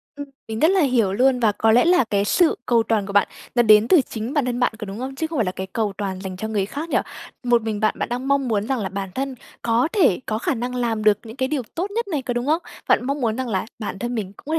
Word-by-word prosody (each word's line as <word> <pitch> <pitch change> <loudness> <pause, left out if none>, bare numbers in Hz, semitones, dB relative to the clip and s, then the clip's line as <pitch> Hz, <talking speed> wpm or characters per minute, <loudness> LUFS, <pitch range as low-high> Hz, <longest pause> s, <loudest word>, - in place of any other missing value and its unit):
Ưm. 285 0 -6 0.2
Mình 220 0 -4
rất 315 - +5
là 385 -2 +3
hiểu 240 -8 +2
luôn, 255 +4 +3
và 225 -3 +3
có 220 +2 +2
lẽ 245 +7 +5
là 355 -4 +5
cái 200 -1 +1
sự 340 - +3
cầu 235 -2 +3
toàn 220 -3 0
của 200 - -7
bạn 205 -1 +4 0.3
nó 240 - +5
đến 215 0 +6
từ 340 0 +6
chính 230 0 -5
bản 290 -4 +1
thân 245 -1 -2
bạn, 245 -3 +2
có 215 - -5
đúng 200 +3 -7
không? 265 +1 -5
Chứ 320 +3 -2
không 315 -2 -5
phải 225 - +2
là 185 - -1
cái 190 +1 -6
cầu 215 -3 -1
toàn 190 -2 -4
dành 185 -1 -6
cho 220 - -4
người 205 -3 0
khác 295 +10 -6
nhỉ? - - +2 0.5
Một 240 -2 +3
mình 215 -2 -3
bạn 215 - +1
bạn - - -2
đang 250 +2 -3
mong 280 -2 +2
muốn 215 -1 0
rằng 265 -3 0
là 195 - -3
bản 195 -1 -4
thân 270 0 -3 0.3
có 235 +4 +2
thể, 300 - +3
có 215 - -1
khả 235 - -1
năng 245 +1 -4
làm 230 -3 -1
được 210 -1 +5
những 225 +2 -9
cái 260 0 -1
điều 285 -2 -1
tốt 380 +5 -2
nhất 465 +1 -2
này, 310 -8 -2
có 245 -1 -3
đúng 240 +1 -2
không? 315 +4 +2 0.3
Bạn - - +4
mong 280 +1 -2
muốn 225 -2 0
rằng 260 -1 -2
là 190 -3 -1
bản 205 -2 -5
thân 240 0 -3
mình 200 -4 -4
cũng - - -16
có 310 - -3
240 Hz, 310 wpm, -22 LUFS, 215-270 Hz, 0.5 s, đến